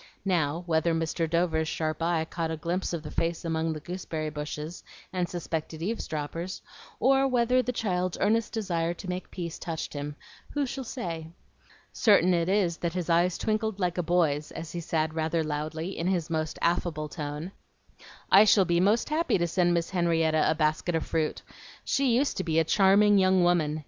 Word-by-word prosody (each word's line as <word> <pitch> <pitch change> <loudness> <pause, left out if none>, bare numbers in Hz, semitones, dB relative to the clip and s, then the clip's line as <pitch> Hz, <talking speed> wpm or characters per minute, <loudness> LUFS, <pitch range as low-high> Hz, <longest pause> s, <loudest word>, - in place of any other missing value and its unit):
Now, 170 -3 0
whether 165 0 +1
Mr. 165 0 -1
Dover's 165 -1 +1
sharp 155 0 -2
eye 165 -1 +1
caught 165 0 -3
a 160 - -3
glimpse 175 +4 -2
of 170 -3 -4
the 150 - -7
face 170 +1 -1
among 160 0 0
the 155 - -6
gooseberry 160 -2 -4
bushes, 150 +2 -6 0.3
and 180 -2 -1
suspected 165 -2 -4
eavesdroppers, 170 -3 -4 0.4
or 270 +1 +4
whether 250 0 +3
the 250 - -2
child's 185 -6 -1
earnest 220 +2 +2
desire 175 -6 -1
to 185 - -9
make 180 0 -4
peace 170 -3 -6
touched 165 -2 -4
him, 145 0 -5 0.4
who 290 -1 +1
shall 265 +1 -5
say? 170 -10 -5 0.7
Certain 195 -5 +4
it 170 0 +1
is 190 -4 +2
that 170 -1 -2
his 180 -2 -2
eyes 175 +1 +3
twinkled 215 -1 -1
like 180 -1 0
a - - +3
boy's, 160 -4 +1
as 165 - -7
he 175 - -4
said 160 -1 -1
rather 160 0 0
loudly, 155 +4 -3
in 170 - -2
his 175 -3 0
most 155 -1 -2
affable 170 -3 0
tone, 150 +3 -5 0.8
"I 195 +2 +9
shall 205 -2 +5
be 170 -1 +2
most 210 +8 +2
happy 315 -4 +1
to 170 - +1
send 175 +1 +2
Miss 170 -1 0
Henrietta 165 -3 +2
a 160 - +2
basket 155 +2 0
of 160 - -1
fruit. 160 -2 -1 0.4
She 275 0 +1
used 280 +4 +1
to 190 - -1
be 160 -2 0
a 165 - +5
charming 200 +3 +5
young 185 -1 +4
woman. 160 -3 +2
170 Hz, 185 wpm, -28 LUFS, 160-185 Hz, 0.8 s, I